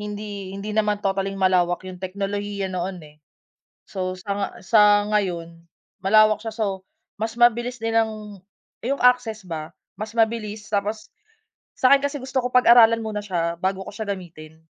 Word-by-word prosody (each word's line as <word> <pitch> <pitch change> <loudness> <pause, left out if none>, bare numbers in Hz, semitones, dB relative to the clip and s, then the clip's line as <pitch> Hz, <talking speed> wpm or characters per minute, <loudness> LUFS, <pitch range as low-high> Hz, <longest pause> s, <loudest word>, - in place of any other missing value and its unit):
hindi 205 -2 -6
hindi 205 +2 -5
naman 210 -1 0
totally-ng 195 0 -1
malawak 185 -2 +2
'yung 185 -1 -9
teknolohiya 200 +1 -3
noon, 185 +1 -3
eh. 150 0 -17 0.7
So 185 -1 -4
sa 200 +2 -6
nga 200 -1 -1
sa 205 +1 +4
ngayon 170 -5 -2 0.4
malawak 215 +1 +4
siya, 225 - -4
so 200 -4 -3 0.3
mas 225 +2 -4
mabilis 240 +1 +3
nilang 220 -3 -2 0.4
'yung 275 +4 -1
access 240 -5 +2
ba, 160 -1 -6 0.3
mas 215 +2 -5
mabilis. 220 -2 -1
Tapos, 210 +1 -2 0.7
sa'kin 275 +2 +5
kasi 285 +1 -2
gusto 260 -1 -2
ko 250 - -2
pag-aralan 235 -2 +6
muna 215 -2 -4
siya 170 -4 -2
bago 190 0 -1
ko - - -8
siya 210 -1 -4
gamitin, 160 -4 -8
205 Hz, 150 wpm, -23 LUFS, 190-220 Hz, 0.7 s, pag-aralan